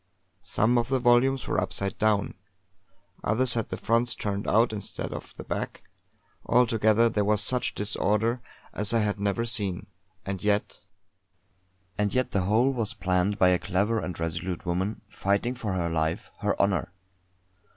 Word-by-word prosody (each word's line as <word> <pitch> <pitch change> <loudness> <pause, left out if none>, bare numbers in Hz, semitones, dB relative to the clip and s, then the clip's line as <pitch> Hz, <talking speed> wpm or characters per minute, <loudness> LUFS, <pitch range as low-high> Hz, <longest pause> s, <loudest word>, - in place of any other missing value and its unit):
Some 115 +6 +3
of 120 - -1
the 135 - +2
volumes 125 +2 +3
were - - 0
upside 100 -1 -3
down; 105 -2 +2 0.9
others 125 +3 +2
had 115 -2 -2
the - - -4
fronts 115 +2 +1
turned 100 -1 -3
out 115 +2 +3
instead 105 -2 -5
of - - -8
the - - -7
back. - - -4 0.6
Altogether 115 -2 +4
there 105 -2 0
was 105 0 +2
such 125 +3 0
disorder 105 +3 0 0.3
as 105 +2 -1
I 115 - +4
had 105 -1 -1
never 100 +3 0
seen. 100 -5 -2 0.4
And 95 -2 -4
yet!... 105 0 0 1.2
And 105 +1 0
yet 130 -1 +1
the 100 - +1
whole 115 +7 +3
was 115 -2 -3
planned 95 0 +1
by 90 - +5
a 90 -1 +3
clever 100 +5 0
and 90 -4 -5
resolute 85 +2 -3
woman, 95 +5 -1
fighting 100 +4 0
for 110 -6 -3
her 90 -2 0
life 80 +2 -1
her 105 -1 -1
honour. 95 -2 +1
105 Hz, 160 wpm, -27 LUFS, 95-115 Hz, 1.2 s, by